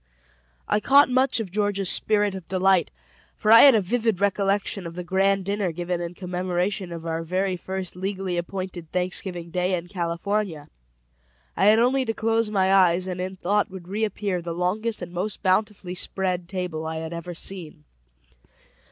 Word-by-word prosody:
I -, -, +2 dB
caught 275 Hz, +7 st, +5 dB
much 255 Hz, 0 st, +2 dB
of 205 Hz, -5 st, -4 dB
Georgia's 205 Hz, -1 st, 0 dB
spirit 210 Hz, -2 st, +1 dB
of 190 Hz, -3 st, -8 dB
delight, 190 Hz, -1 st, +2 dB, 0.5 s
for 215 Hz, -, +2 dB
I 230 Hz, -, +10 dB
had 275 Hz, -4 st, +9 dB
a 215 Hz, -, +3 dB
vivid 225 Hz, 0 st, 0 dB
recollection 200 Hz, -1 st, 0 dB
of 165 Hz, -, -9 dB
the 180 Hz, -, -5 dB
grand 195 Hz, +1 st, +1 dB
dinner 200 Hz, -2 st, -1 dB
given 175 Hz, +1 st, -3 dB
in 170 Hz, 0 st, -5 dB
commemoration 180 Hz, +1 st, -2 dB
of 165 Hz, -1 st, -7 dB
our 165 Hz, 0 st, -2 dB
very 185 Hz, +3 st, -1 dB
first 185 Hz, 0 st, -4 dB
legally 190 Hz, -1 st, -3 dB
appointed 175 Hz, -1 st, -5 dB
Thanksgiving 180 Hz, -1 st, -2 dB
Day 180 Hz, +1 st, 0 dB
in 175 Hz, 0 st, -6 dB
California; 170 Hz, -2 st, -2 dB, 0.9 s
I -, -, +3 dB
had 215 Hz, +1 st, +7 dB
only 255 Hz, +3 st, +3 dB
to 225 Hz, -1 st, -2 dB
close 225 Hz, 0 st, +1 dB
my 190 Hz, -2 st, +2 dB
eyes, 185 Hz, -2 st, +4 dB
and 180 Hz, -1 st, -4 dB
in 185 Hz, +1 st, -4 dB
thought 200 Hz, +3 st, 0 dB
would 185 Hz, -2 st, -10 dB
reappear 200 Hz, -2 st, -2 dB
the 170 Hz, -1 st, -5 dB
longest 205 Hz, +4 st, -1 dB
and 175 Hz, -, -7 dB
most 190 Hz, +4 st, -3 dB
bountifully 190 Hz, -1 st, 0 dB
spread 180 Hz, -1 st, -2 dB
table 175 Hz, -4 st, -4 dB
I 160 Hz, -, -4 dB
had 160 Hz, +1 st, -5 dB
ever 170 Hz, +1 st, -6 dB
seen. 165 Hz, -, -5 dB
185 Hz, 170 wpm, -24 LUFS, 175-205 Hz, 0.9 s, I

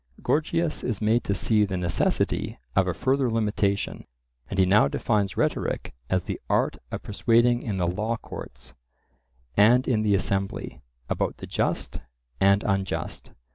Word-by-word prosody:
Gorgias 160 Hz, +1 st, 0 dB
is 115 Hz, -5 st, -2 dB
made 110 Hz, +2 st, +2 dB
to 100 Hz, -, 0 dB
see 105 Hz, +2 st, +2 dB
the 95 Hz, -2 st, -1 dB
necessity 90 Hz, -2 st, 0 dB, 0.2 s
of 95 Hz, -1 st, +3 dB
a 90 Hz, -, 0 dB
further 130 Hz, -, +1 dB
limitation, 105 Hz, -3 st, -1 dB, 0.4 s
and 95 Hz, -, -4 dB
he 95 Hz, -, +5 dB
now 100 Hz, +4 st, +5 dB
defines 100 Hz, -4 st, 0 dB
rhetoric -, -, -1 dB, 0.2 s
as 95 Hz, -2 st, +1 dB
the -, -, -5 dB
art -, -, +1 dB
of -, -, -5 dB
persuading 120 Hz, +3 st, +2 dB
in 105 Hz, -5 st, -3 dB
the 90 Hz, -, +1 dB
law 105 Hz, +6 st, -1 dB
courts, -, -, -10 dB, 0.8 s
and 120 Hz, +5 st, +5 dB
in 115 Hz, -4 st, +2 dB
the 105 Hz, -2 st, +3 dB
assembly, 95 Hz, 0 st, -2 dB, 0.3 s
about -, -, -1 dB
the -, -, -8 dB
just -, -, -2 dB, 0.4 s
and 100 Hz, +1 st, +4 dB
unjust. 95 Hz, -2 st, -2 dB
105 Hz, 150 wpm, -26 LUFS, 95-115 Hz, 0.8 s, he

